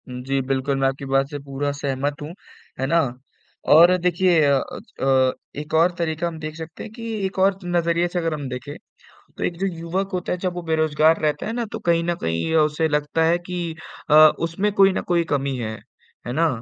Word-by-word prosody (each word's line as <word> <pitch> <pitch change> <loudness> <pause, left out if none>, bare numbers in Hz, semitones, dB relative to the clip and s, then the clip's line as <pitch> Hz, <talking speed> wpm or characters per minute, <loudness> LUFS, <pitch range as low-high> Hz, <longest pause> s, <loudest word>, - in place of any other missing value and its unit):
हुँ। 125 0 -6
जी 135 0 0
बिल्कुल, 135 +1 -1
मैं 135 - +3
आपकी 135 +1 -3
बात 135 0 +1
से 145 -1 -6
पूरा 140 +1 -3
सहमत 140 +1 -2
हूँ, 150 +3 -6 0.5
है 135 - 0
ना, 165 +3 +3 0.7
और 170 +4 +7
देखिए 180 -1 +2
अ, 140 - +4
अच - - -9
अ, 130 -1 +3 0.3
एक 150 +1 -11
और 165 +3 +4
तरीका 170 0 -1
हम 165 -2 -6
देख 155 0 -6
सकते 160 0 -8
हैं 215 - -9
कि 230 0 -10 0.2
एक 190 - -5
और 190 0 +3
नजरिए 170 0 +1
से 175 0 -2
अगर 165 -2 -1
हम 145 -3 -4
देखें, 130 +3 -6 0.6
तो - - -4
एक 170 - -1
जो 195 - 0
युवक 180 +2 -3
होता 180 -1 -2
है 180 - -2
जब 180 0 -2
वो 175 - -5
बेरोजगार 160 0 +2
रहता 150 -1 -1
है 220 - -2
ना 240 0 -2
तो - - -3
कहीं 170 -1 +3
न 175 0 0
कहीं 80 0 -1
ये 160 - +1
उसे 155 +1 +2
लगता 150 +2 0
है 170 +2 +3
कि 175 -2 -3 0.4
अ, - - +5 0.2
उसमें 170 +6 -1
कोई 195 -1 +5
न - - -1
कोई 170 -1 +2
कमी 140 -1 -1
है, 110 -2 -4 0.5
है 120 - -3
ना? 165 +5 +2
160 Hz, 225 wpm, -22 LUFS, 140-175 Hz, 0.7 s, और